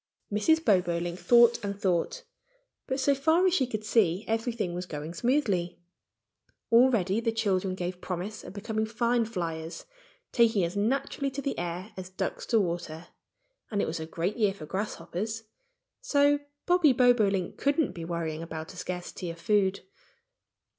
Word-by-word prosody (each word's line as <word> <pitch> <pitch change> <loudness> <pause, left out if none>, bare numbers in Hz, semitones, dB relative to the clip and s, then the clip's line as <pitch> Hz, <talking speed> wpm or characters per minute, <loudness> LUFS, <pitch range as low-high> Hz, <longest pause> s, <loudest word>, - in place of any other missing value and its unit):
Mrs. 320 +10 +3
Bobolink 175 -3 +1
thought 235 +5 +5
and 200 0 -4
thought. 190 - 0 0.6
But 265 0 -1
so 280 +1 +3
far 320 +6 +3
as 370 - +3
she 270 -8 +2
could 215 -3 -4
see 200 -3 +2
everything 225 -4 -1
was 180 +1 -4
going 150 +1 -6
smoothly. 200 - 0 0.9
Already 230 -5 +4
the 230 0 0
children 195 -4 0
gave 180 0 -4
promise 190 +4 -5
of - - -9
becoming 220 +1 -2
fine 235 +1 +1
fliers, 165 -6 -5 0.5
taking 225 -5 +3
as 170 +3 -2
naturally 270 +6 0
to 270 +1 -5
the 275 - -1
air 175 +4 -4
as 185 -1 -6
ducks 185 - -4
to 230 - +3
water. 170 -3 -3 0.6
And 205 - -1
it - - +2
was 160 +1 -3
a 160 - -5
great 175 +6 -2
year 205 -4 +2
for 155 - -9
grasshoppers; 200 +4 -4 0.6
so 290 -9 +3 0.3
Bobby 355 -6 +5
Bobolink 215 -7 +3
couldn't 285 - +1
be 170 -2 -7
worrying 165 -2 -3
about 160 0 -7
a - - -13
scarcity 180 0 -5
of 165 0 -7
food. 195 +1 +2
200 Hz, 155 wpm, -28 LUFS, 175-235 Hz, 0.9 s, thought